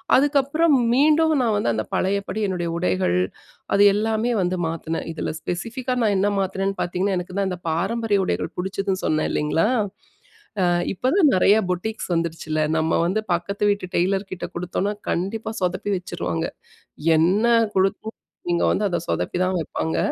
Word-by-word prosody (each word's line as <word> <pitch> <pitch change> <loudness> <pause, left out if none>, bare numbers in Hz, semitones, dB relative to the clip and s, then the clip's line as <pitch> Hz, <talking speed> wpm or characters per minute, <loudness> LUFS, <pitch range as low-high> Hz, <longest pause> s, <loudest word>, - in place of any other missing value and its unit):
அதுக்கப்பறம், 290 +3 +3 0.2
மீண்டும் 310 +4 +4
நான் 225 -4 +1
வந்து 205 - +1
அந்த 110 0 -1
பழையபடி 200 +2 -1
என்னுடைய 175 -3 -2
உடைகள், 180 - +1 0.6
அது 200 - +5
எல்லாமே 220 +3 0
வந்து 180 0 0
மாத்துனேன். 165 0 -4
இதுல 155 - -3
ஸ்பெசிஃபிக்கா 235 +8 -3
நான் 210 -2 +2
என்ன 200 +2 +2
மாத்துனேன்னு 195 +1 -1
பார்த்தீங்கன்னா, 185 +2 0
எனக்கு 180 +1 -8
தான் 195 -1 +1
இந்த 180 -1 -5
பாரம்பரிய 205 +6 0
உடைகள் - - -2
புடிச்சதுன்னு 190 +1 -2
சொன்னே 155 0 +1
இல்லீங்களா? 150 +5 +1 0.9
அ - - +3 0.3
இப்போதான் 280 - +3
நிறையா 200 +3 +5
புட்டிக்ஸ் 190 +2 -3
வந்துடுச்சுல்ல. 165 -2 -2 0.2
நம்ம 160 +1 +1
வந்து 195 +5 0
பக்கத்து 200 +4 -4
வீட்டு 200 -2 -3
டெய்லர் 190 +3 0
கிட்ட 180 - -5
குடுத்தோம்னா, 180 +3 -2 0.2
கண்டிப்பா 205 +6 -2
சொதப்பி 185 +3 -1
வச்சுருவாங்க. 85 - -3 0.7
என்ன 185 +7 +3 0.3
கொடுத்தாலும் 195 +3 -1 0.3
நீங்க 170 0 +2
வந்து 210 - 0
அத 180 - -1
சொதப்பிதான் 175 - 0
வைப்பாங்க. 160 0 -2
190 Hz, 145 wpm, -23 LUFS, 175-220 Hz, 0.9 s, அது